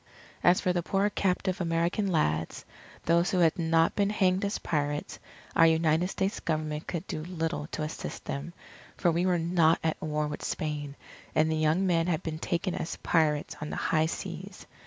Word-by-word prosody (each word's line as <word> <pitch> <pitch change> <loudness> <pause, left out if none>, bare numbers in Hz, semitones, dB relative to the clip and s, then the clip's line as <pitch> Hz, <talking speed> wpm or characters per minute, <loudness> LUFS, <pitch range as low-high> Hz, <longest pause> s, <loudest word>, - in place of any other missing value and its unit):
As 175 +1 +5
for 180 - +1
the 175 - 0
poor 195 +4 +1
captive 185 -1 0
American 170 +4 0
lads, 80 - 0 0.4
those 170 +3 +3
who 190 - 0
had 170 -1 +3
not 165 0 +3
been 200 -1 +2
hanged 190 -2 +2
as 200 +1 -1
pirates, 145 -1 -2 0.4
our 165 - +7
United 160 +1 +3
States 190 +1 -2
Government 155 -1 -2
could 170 -3 -3
do 155 - -4
little 165 -3 -3
to 155 - -4
assist 155 - -6
them, 140 +5 -4 0.5
for 175 - +3
we 175 +3 +1
were 180 -1 +3
not 165 -1 +3
at 160 -1 -1
war 150 -1 -1
with 150 0 -5
Spain, 145 -2 -3 0.4
and 155 +1 +3
the - - +1
young 155 +4 +2
men 170 -2 +2
had 170 0 0
been 160 -1 -4
taken 170 +1 -1
as 160 - -3
pirates 150 -3 +1
on 150 - -4
the - - -4
high 160 0 +1
seas. - - -6
165 Hz, 185 wpm, -29 LUFS, 155-180 Hz, 0.5 s, our